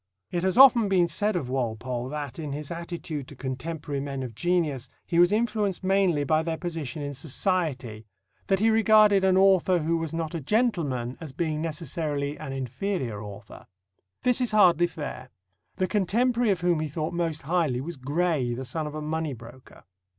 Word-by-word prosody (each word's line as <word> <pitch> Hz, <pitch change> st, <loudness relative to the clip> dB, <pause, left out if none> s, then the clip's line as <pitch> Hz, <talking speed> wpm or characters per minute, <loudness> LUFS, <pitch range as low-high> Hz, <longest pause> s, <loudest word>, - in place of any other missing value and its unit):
It 175 Hz, -, -1 dB
has 190 Hz, +2 st, +1 dB
often 245 Hz, -5 st, +7 dB
been 180 Hz, -3 st, +3 dB
said 210 Hz, +4 st, 0 dB
of 155 Hz, -8 st, -2 dB
Walpole 125 Hz, 0 st, -3 dB
that, 145 Hz, 0 st, -5 dB
in 150 Hz, -3 st, -4 dB
his 150 Hz, +1 st, -6 dB
attitude 170 Hz, -4 st, -5 dB
to 145 Hz, -, -12 dB
contemporary 140 Hz, +3 st, -4 dB
men 135 Hz, -1 st, -4 dB
of 120 Hz, -3 st, -6 dB
genius, 150 Hz, -1 st, -1 dB, 0.2 s
he 170 Hz, -, 0 dB
was 175 Hz, +2 st, +6 dB
influenced 210 Hz, -4 st, 0 dB
mainly 190 Hz, -6 st, +2 dB
by 155 Hz, +3 st, +2 dB
their 160 Hz, 0 st, -3 dB
position 160 Hz, -5 st, -4 dB
in 145 Hz, 0 st, -4 dB
Society 135 Hz, -, -2 dB, 0.4 s
that 195 Hz, -1 st, +2 dB
he 225 Hz, +2 st, +4 dB
regarded 215 Hz, -2 st, +5 dB
an 190 Hz, -1 st, +4 dB
author 190 Hz, -1 st, +4 dB
who 165 Hz, +1 st, 0 dB
was 165 Hz, -2 st, -3 dB
not 165 Hz, -1 st, -3 dB
a 165 Hz, -, -3 dB
gentleman 145 Hz, -, 0 dB
as 155 Hz, -5 st, -8 dB
being 155 Hz, 0 st, -2 dB
necessarily 155 Hz, -3 st, -3 dB
an 135 Hz, -, -6 dB
inferior 130 Hz, -, -3 dB
author. 100 Hz, -2 st, -11 dB, 0.6 s
This 250 Hz, 0 st, +3 dB
is 245 Hz, -, +2 dB
hardly 175 Hz, -5 st, +5 dB
fair. 145 Hz, -5 st, -7 dB, 0.5 s
The 185 Hz, -, 0 dB
contemporary 230 Hz, +5 st, +1 dB
of 190 Hz, -3 st, +1 dB
whom 175 Hz, -2 st, +2 dB
he 155 Hz, -, -2 dB
thought 155 Hz, +2 st, -4 dB
most 165 Hz, -2 st, -2 dB
highly 155 Hz, -5 st, 0 dB
was 165 Hz, +6 st, -5 dB
Gray, 145 Hz, -2 st, 0 dB
the 130 Hz, +2 st, -5 dB
son 150 Hz, +5 st, -3 dB
of 150 Hz, -, -7 dB
a 155 Hz, -, -4 dB
money 160 Hz, -1 st, -2 dB
broker. 120 Hz, +2 st, -14 dB
160 Hz, 180 wpm, -26 LUFS, 135-185 Hz, 0.6 s, often